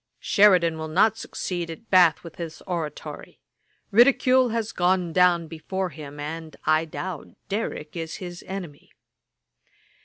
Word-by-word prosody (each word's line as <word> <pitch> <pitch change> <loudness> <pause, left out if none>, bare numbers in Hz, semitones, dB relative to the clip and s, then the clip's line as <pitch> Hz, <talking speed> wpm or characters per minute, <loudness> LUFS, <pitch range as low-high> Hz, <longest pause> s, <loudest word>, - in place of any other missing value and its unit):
'Sheridan 180 -6 +4
will 160 - -4
not 200 +7 +3
succeed 175 -5 -4
at 165 +8 -10
Bath 180 -4 +5
with 170 -2 -11
his 165 -2 -7
oratory. 165 -5 -6 0.5
Ridicule 255 +2 +5
has 225 -1 -2
gone 180 -1 +1
down 180 -1 +4
before 180 +4 -4
him, 145 -2 -10
and, 160 +2 -6
I 155 +1 +3
doubt, 170 0 -7
Derrick 200 -7 -4
is 165 -1 -5
his 175 -2 -8
enemy.' 180 -7 -8
175 Hz, 130 wpm, -25 LUFS, 160-190 Hz, 0.5 s, Bath